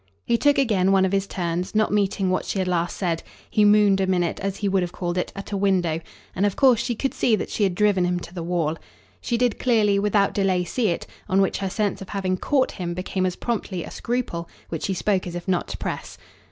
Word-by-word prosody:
He 235 - +2
took 290 +4 +3
again 205 -8 +3
one 190 -1 +4
of 185 - 0
his 195 0 0
turns, 175 +1 -3
not 215 -1 +2
meeting 200 -2 +1
what 185 - 0
she - - -3
had 185 -1 0
last 175 -1 -1
said; 170 -4 -1 0.3
he 210 - +2
mooned 205 -2 +5
a 190 - +1
minute, 180 -2 0
as 195 0 -3
he 205 - -1
would 195 -1 +2
have 175 -1 -2
called 175 -1 -3
it, 180 - -1
at 195 +1 -7
a - - -1
window; 185 -5 +1 0.4
and 190 - 0
of 205 -2 +1
course 255 -5 +5
she 240 0 -1
could 270 +4 -2
see 225 - +2
that - - -4
she - - -3
had 190 -3 +2
driven 205 -2 +3
him 180 0 0
to 170 - -10
the 175 - -5
wall. 165 -2 -1 0.4
She 235 - -1
did 245 -2 +1
clearly, 215 -5 +3
without 205 0 +2
delay, 190 -3 +1
see 225 +6 -1
it; 170 - -1 0.2
on 190 - +3
which 195 - +1
her 195 - -2
sense 205 0 -1
of 195 - -8
having 190 -2 -1
"caught" 265 +6 +1
him 175 -2 -4
became 185 +1 -1
as 180 - -3
promptly 205 -7 -3
a - - -9
scruple, 230 -9 -3 0.2
which 165 - -3
she 195 - -1
spoke 190 0 0
as 175 - -6
if 175 +1 -6
not 185 -2 0
to - - -5
press. - - -5
195 Hz, 250 wpm, -24 LUFS, 180-210 Hz, 0.4 s, mooned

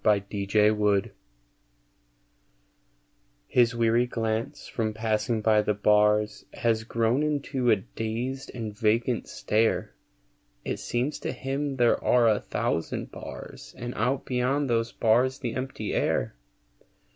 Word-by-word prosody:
THE 105 -1 +4
PANTHER 105 0 +2 2.3
His 120 - +3
weary 115 +1 +2
glance, 115 -2 -3
from 110 -2 -2
passing 110 0 0
by 110 -1 +4
the 105 0 0
bars, 105 0 +3
Has 115 -2 0
grown 115 +4 +1
into 140 -4 0
a 110 - +7
dazed 115 +7 -4
and 110 -3 -5
vacant 115 +3 +1
stare; 110 +2 0 0.7
It - - -2
seems 125 +5 -2
to - - -3
him 135 +1 -3
there 120 -2 +2
are 120 -2 +4
a 110 -2 +3
thousand 80 - -2
bars - - -9
And 120 +1 -5
out 130 +5 -1
beyond 130 +3 0
those 115 0 +1
bars 125 +4 +2
the 120 -4 -4
empty 130 -5 -4
air. - - 0
115 Hz, 120 wpm, -27 LUFS, 105-125 Hz, 2.3 s, a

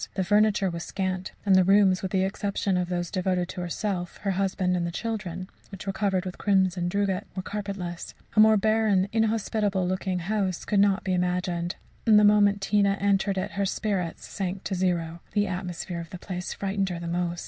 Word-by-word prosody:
The 190 - +1
furniture 205 0 +3
was 170 -1 -5
scant, 185 -1 -3
and 195 -2 +5
the 185 - +6
rooms, 195 0 +4
with 190 - -3
the 190 0 +1
exception 195 0 -1
of 180 -1 0
those 175 -1 -2
devoted 185 -1 0
to 180 - -5
herself, 180 0 -3
her 200 - +1
husband 185 -1 0
and 175 -1 0
the - - -4
children, 185 -3 -4 0.2
which 195 -3 -9
were 195 - -2
covered 190 -2 0
with 185 - -6
crimson 185 -3 +2
drugget, 200 +1 -1
were 185 - -3
carpetless. 195 -4 -5 0.2
A - - +4
more 220 0 +7
barren, 215 -2 +2
inhospitable 215 -4 +1
looking 185 0 -1
house 190 0 -1
could 205 - +1
not 195 -1 +3
be 190 - 0
imagined, 180 -1 -1 0.3
and 215 -2 +7
the 210 - +6
moment 205 -1 +5
Tina 200 0 +2
entered 200 0 +1
it, 185 - -2
her 200 0 -1
spirits 190 -4 -2
sank 190 -1 -4
to 195 - -3
zero. 175 -3 -1
The 205 -1 +2
atmosphere 180 -2 -4
of 165 - -10
the 180 - -7
place 180 0 -5
frightened 195 -1 -1
her 175 - -4
the 170 0 -6
most. 175 0 -1
190 Hz, 200 wpm, -26 LUFS, 180-200 Hz, 0.3 s, more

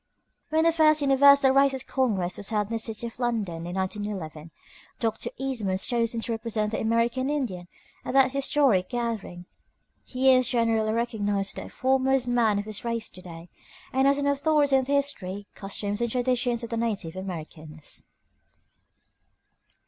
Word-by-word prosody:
When 315 +1 +2
the 330 - +5
first 310 -2 +4
Universal 280 0 +6
Races 270 -1 +3
Congress 200 -9 -1
was 200 - -4
held 210 -2 -1
in - - -4
the 225 - 0
city 225 0 -3
of 235 +1 -8
London 205 -9 -2
in 175 - -5
1911, 190 -5 -4 0.5
Dr. 225 -2 -2
Eastman 260 -7 -2
was 190 - 0
chosen 230 -1 0
to 235 - -3
represent 220 -2 -2
the 220 - -2
American 235 +4 +1
Indian 230 -12 -3 0.4
at - - -4
that 265 -1 +5
historic 275 -8 +2
gathering. 225 -7 -4 0.6
He 260 +1 +3
is 255 -1 +3
generally 225 -3 +1
recognized 205 -4 -1
as - - -7
the - - -10
foremost 265 -1 +1
man 230 -4 +2
of 205 - -3
his 215 +2 -6
race 230 -1 -2
to 185 - -12
day, 170 -1 -11 0.4
and 265 +1 +3
as 280 0 +3
an 285 - -1
authority 285 0 +2
on 265 -1 +2
the 280 - -1
history, 205 -9 -2
customs, 205 +1 -3
and 235 - 0
traditions 245 0 0
of 235 - -6
the 230 - -1
native 205 -8 -2
Americans. 160 -4 -6
230 Hz, 165 wpm, -26 LUFS, 200-265 Hz, 0.6 s, Universal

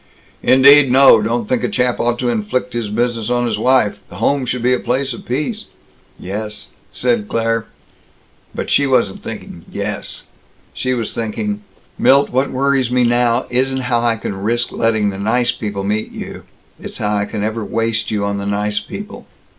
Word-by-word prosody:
"Indeed 140 +1 +6
no. 130 -4 +7
Don't 115 +1 -1
think 125 +1 0
a - - 0
chap 125 -1 0
ought 120 0 +1
to 125 0 -1
inflict 115 +2 -2
his 115 -3 -2
business 115 0 -1
on 120 0 +1
his 110 -3 -1
wife. 110 -4 +2
The - - -11
home 130 +6 0
should 125 0 -2
be 125 +1 +3
a 125 - +1
place 130 +1 -1
of - - -11
peace." 155 - -2 0.5
"Yes," 105 +3 -6 0.2
said 120 -4 0
Claire. 115 -1 0 0.9
But - - -3
she 140 - +3
wasn't 120 -7 +1
thinking - - -8
"Yes." - - -4 0.5
She 130 0 -1
was 115 -3 -3
thinking, 205 - -3 0.4
"Milt, 140 +1 +4
what 130 +3 +1
worries 135 -1 +1
me 125 0 +2
now 120 0 +2
isn't 130 +1 +1
how 125 -2 +1
I 120 -1 +2
can 100 -3 -5
risk 120 +3 0
letting 110 -3 +1
the 95 - -7
'nice 120 +4 +2
people' 105 -5 -4
meet 105 +2 -2
you. - - -8 0.3
It's - - -8
how 105 -1 -1
I 100 0 0
can 105 0 -4
ever 110 +1 -2
waste 115 +2 -1
you 105 -2 -1
on 100 0 -2
the 100 - -4
'nice 105 +1 0
people.' 205 - -9
120 Hz, 185 wpm, -18 LUFS, 105-125 Hz, 0.9 s, no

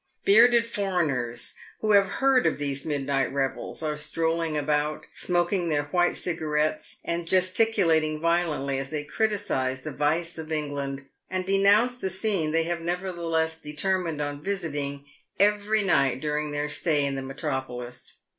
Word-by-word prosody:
Bearded 235 +3 +6
foreigners, 155 - -1 0.3
who 215 - +1
have 200 -1 +6
heard 265 +4 +3
of - - 0
these 140 -1 -3
midnight 140 -2 0
revels, 135 +3 -3
are 155 -1 -1
strolling 160 +1 -1
about, 150 +1 0
smoking 175 0 0
their 145 -2 +1
white 175 +4 +1
cigarettes 155 -2 -1
and 170 0 -2
gesticulating 185 -5 +2
violently 155 -5 0
as 135 0 -5
they 150 -1 -3
criticise 150 -9 -1
the 155 - -5
vice 160 +4 -1
of 160 0 -7
England 140 -3 -3 0.2
and 185 0 -2
denounce 200 +6 +4
the 190 - -2
scene 190 -4 +1
they 165 +1 +2
have 170 0 -3
nevertheless 170 -2 -1
determined 165 +1 -1
on 145 0 -4
visiting 145 -7 -3 0.3
every 210 +1 +3
night 140 -9 +2
during 150 +1 -2
their 145 0 -1
stay 150 -1 0
in 140 - -1
the 135 - -3
metropolis. 130 -3 -5
160 Hz, 145 wpm, -26 LUFS, 145-185 Hz, 0.3 s, Bearded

